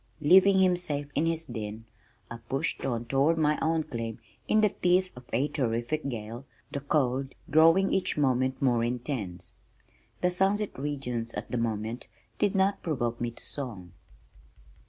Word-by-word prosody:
Leaving 190 Hz, +5 st, +6 dB
him 185 Hz, -1 st, +4 dB
safe 145 Hz, -5 st, -3 dB
in 155 Hz, +3 st, +1 dB
his 165 Hz, 0 st, -1 dB
den, 110 Hz, -3 st, -6 dB, 0.5 s
I 120 Hz, -, -5 dB
pushed 135 Hz, -, -1 dB
on 120 Hz, -3 st, -2 dB
toward 135 Hz, +7 st, +2 dB
my 150 Hz, -1 st, +2 dB
own 160 Hz, 0 st, +1 dB
claim, 115 Hz, -4 st, -5 dB, 0.3 s
in 215 Hz, -, +4 dB
the 210 Hz, -, +5 dB
teeth 185 Hz, 0 st, +2 dB
of 125 Hz, 0 st, -12 dB
a 130 Hz, +6 st, +1 dB
terrific 130 Hz, +2 st, -1 dB
gale, 115 Hz, +1 st, -6 dB, 0.3 s
the 140 Hz, -, -3 dB
cold 135 Hz, -2 st, 0 dB, 0.2 s
growing 165 Hz, +5 st, +5 dB
each 190 Hz, -, 0 dB
moment 130 Hz, -2 st, +1 dB
more 120 Hz, -4 st, +2 dB
intense. 120 Hz, -6 st, -3 dB, 0.7 s
"The 180 Hz, -, +2 dB
sunset 195 Hz, +3 st, +1 dB
regions" 125 Hz, -5 st, -3 dB
at -, -, -6 dB
that 125 Hz, -, 0 dB
moment 115 Hz, +1 st, -3 dB, 0.3 s
did 205 Hz, -1 st, +2 dB
not 195 Hz, +1 st, +2 dB
provoke 120 Hz, -8 st, -2 dB
me 120 Hz, -, 0 dB
to 115 Hz, -, -14 dB
song. 110 Hz, -, -6 dB
135 Hz, 155 wpm, -28 LUFS, 120-165 Hz, 0.7 s, Leaving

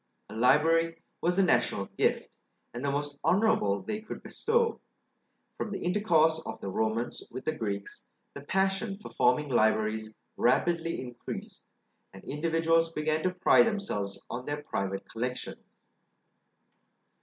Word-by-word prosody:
A -, -, -9 dB
library 165 Hz, +7 st, +3 dB, 0.2 s
was 180 Hz, +2 st, +1 dB
a 195 Hz, -, +5 dB
national 120 Hz, -, +2 dB
gift, -, -, +1 dB, 0.5 s
and 120 Hz, +2 st, -5 dB
the 140 Hz, -, +1 dB
most 145 Hz, 0 st, -3 dB
honourable 180 Hz, -, +2 dB
they 215 Hz, 0 st, -3 dB
could 220 Hz, -, -8 dB
bestow. 460 Hz, 0 st, 0 dB, 0.8 s
From -, -, -3 dB
the 200 Hz, -, -4 dB
intercourse 165 Hz, -4 st, +3 dB
of 110 Hz, -5 st, -6 dB
the 100 Hz, -, -5 dB
Romans 110 Hz, +3 st, -1 dB
with 130 Hz, -, -8 dB
the 155 Hz, -, 0 dB
Greeks, 100 Hz, -5 st, -5 dB, 0.3 s
the -, -, -8 dB
passion 195 Hz, +5 st, 0 dB
for 210 Hz, -, -10 dB
forming 125 Hz, +4 st, +2 dB
libraries 110 Hz, -2 st, +1 dB, 0.2 s
rapidly 165 Hz, +6 st, +2 dB
increased, 125 Hz, -2 st, -7 dB, 0.5 s
and 95 Hz, -, -12 dB
individuals 165 Hz, +2 st, +1 dB
began 155 Hz, 0 st, 0 dB
to 185 Hz, -, +1 dB
pride 185 Hz, +5 st, +5 dB
themselves 105 Hz, -, -2 dB
on 125 Hz, +1 st, -6 dB
their 145 Hz, 0 st, -3 dB
private 95 Hz, -7 st, -3 dB
collections. 125 Hz, +2 st, -4 dB
150 Hz, 135 wpm, -29 LUFS, 115-175 Hz, 0.8 s, a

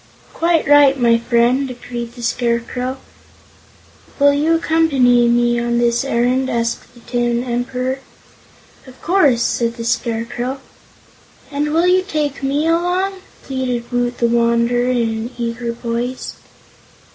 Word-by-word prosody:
"Quite 335 Hz, -2 st, +1 dB
right, 285 Hz, -2 st, +5 dB
my 235 Hz, -1 st, +4 dB
friend!" 240 Hz, +3 st, +1 dB
agreed 240 Hz, -1 st, -7 dB
the 240 Hz, -, -10 dB
Scarecrow. 245 Hz, +2 st, -2 dB, 1.2 s
"Will 285 Hz, 0 st, +5 dB
you 305 Hz, +3 st, +2 dB
accompany 275 Hz, -8 st, +3 dB
me 240 Hz, 0 st, +2 dB
on 235 Hz, 0 st, -1 dB
this 235 Hz, 0 st, +1 dB
errand?" 260 Hz, 0 st, 0 dB
asked 230 Hz, +1 st, -3 dB
the 240 Hz, -, -16 dB
Tin 240 Hz, 0 st, -1 dB
Emperor. 250 Hz, +2 st, -2 dB, 0.9 s
"Of 260 Hz, 0 st, -15 dB
course," 295 Hz, -10 st, +3 dB
said 235 Hz, -1 st, -1 dB
the 230 Hz, -1 st, -6 dB
Scarecrow. 240 Hz, +3 st, -2 dB, 0.9 s
"And 295 Hz, +1 st, -1 dB
will 330 Hz, +3 st, +2 dB
you 365 Hz, +1 st, +4 dB
take 305 Hz, -7 st, -3 dB
me 280 Hz, +3 st, 0 dB
along?" 360 Hz, +3 st, 0 dB, 0.2 s
pleaded 255 Hz, -3 st, -3 dB
Woot 245 Hz, 0 st, -1 dB
the 235 Hz, -, +1 dB
Wanderer 235 Hz, +1 st, +2 dB
in 240 Hz, -2 st, +1 dB
an 225 Hz, +2 st, -4 dB
eager 235 Hz, 0 st, -3 dB
voice. 235 Hz, +2 st, -4 dB
245 Hz, 130 wpm, -18 LUFS, 235-280 Hz, 1.2 s, right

